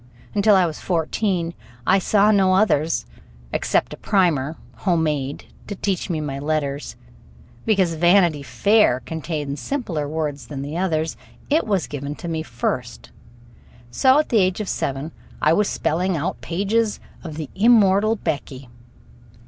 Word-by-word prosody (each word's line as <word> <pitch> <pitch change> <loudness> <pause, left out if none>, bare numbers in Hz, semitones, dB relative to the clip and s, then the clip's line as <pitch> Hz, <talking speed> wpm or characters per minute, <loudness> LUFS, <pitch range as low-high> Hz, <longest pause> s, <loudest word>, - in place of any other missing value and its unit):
Until 205 0 +4
I 185 -2 +4
was 160 -2 -4
fourteen 170 0 -1 0.3
I 190 +6 +4
saw 205 +2 +3
no 190 -2 +4
others, 165 - +2 0.5
except - - 0
a - - -8
primer, 165 -6 +1 0.2
homemade, 155 -7 -1 0.2
to 205 - -5
teach 195 -1 -2
me 165 -3 -1
my 140 -3 -4
letters. 145 -1 -2 0.7
Because 190 -6 +3
"Vanity 175 -2 +4
Fair" 200 - +3
contained 150 0 -4
simpler 175 - -3
words 150 -2 -3
than 140 -2 -5
the 145 +3 -5
others, 165 -3 -1 0.3
it 310 -2 +2
was 195 -5 +1
given 145 0 -5 0.2
me 160 -1 -2
first; 120 -3 -4 0.8
so 260 - +4
at 305 - +1
the 225 - +3
age 185 0 +1
of 210 - -3
seven 140 +1 -3 0.3
I - - +4
was 205 +4 +2
spelling 180 +3 0
out 155 - -3
pages 205 +5 0 0.2
of 160 -4 -7
the 155 -3 -6
immortal 215 -1 +4
Becky. 140 - -4
170 Hz, 140 wpm, -22 LUFS, 150-200 Hz, 0.8 s, Until